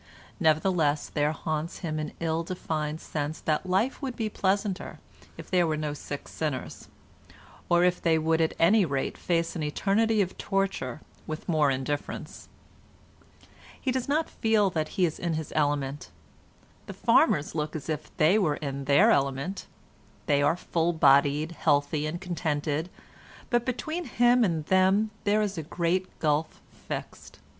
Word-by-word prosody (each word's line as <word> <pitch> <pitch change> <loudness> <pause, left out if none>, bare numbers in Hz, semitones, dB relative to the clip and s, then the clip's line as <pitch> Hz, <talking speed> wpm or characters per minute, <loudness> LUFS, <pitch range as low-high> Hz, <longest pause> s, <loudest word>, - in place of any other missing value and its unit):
Nevertheless 155 -2 +2
there 150 0 +1
haunts 155 +1 -3
him 155 -1 -2
an 155 - -4
ill 165 0 0
defined 160 -3 -3
sense 150 0 -4
that 160 +4 -1
life 210 +11 +1
would 260 -3 -4
be 220 -2 -2
pleasanter 200 -1 -1 0.4
if - - -10
there 180 -2 +3
were 155 -1 0
no 150 -1 -2
sick 145 -1 -7
sinners, 150 -5 -4 0.8
or 175 0 +4
if 180 0 +2
they 165 -1 +3
would 160 +1 +1
at 160 - +1
any 200 +5 +5
rate 140 -5 -2
face 170 -1 -1
an 165 - -3
eternity 210 +8 +1
of 190 -2 -1
torture 195 - -2 0.3
with 155 0 -6
more 155 -4 +3
indifference. 135 +2 -4 1.3
He 260 - -1
does 260 +1 -2
not 310 +3 +1
feel 215 -3 +2
that 155 -2 -1
he 185 - +4
is 160 - -3
in 170 -2 -1
his 155 -1 -5
element. 145 -2 -1 0.8
The - - -7
farmers 150 0 +3
look 155 -1 -3
as 155 - -5
if 155 -1 -3
they 170 +8 +4
were 155 -7 +1
in 140 -2 -5
their 140 +1 +5
element. 140 +7 -1 0.6
They 145 -2 +2
are 145 +4 +2
full 170 -1 0
bodied, 145 +1 +4
healthy 145 -1 +1
and 170 +3 -4
contented; 160 -3 -2 0.6
but 240 0 +2
between 315 +7 -3
him 245 0 +4
and 165 -7 0
them 190 +4 +3
there 210 +1 +3
is 200 -4 -3
a - - -2
great 175 +3 -2
gulf 155 0 0
fixed. - - -8
160 Hz, 155 wpm, -27 LUFS, 150-190 Hz, 1.3 s, any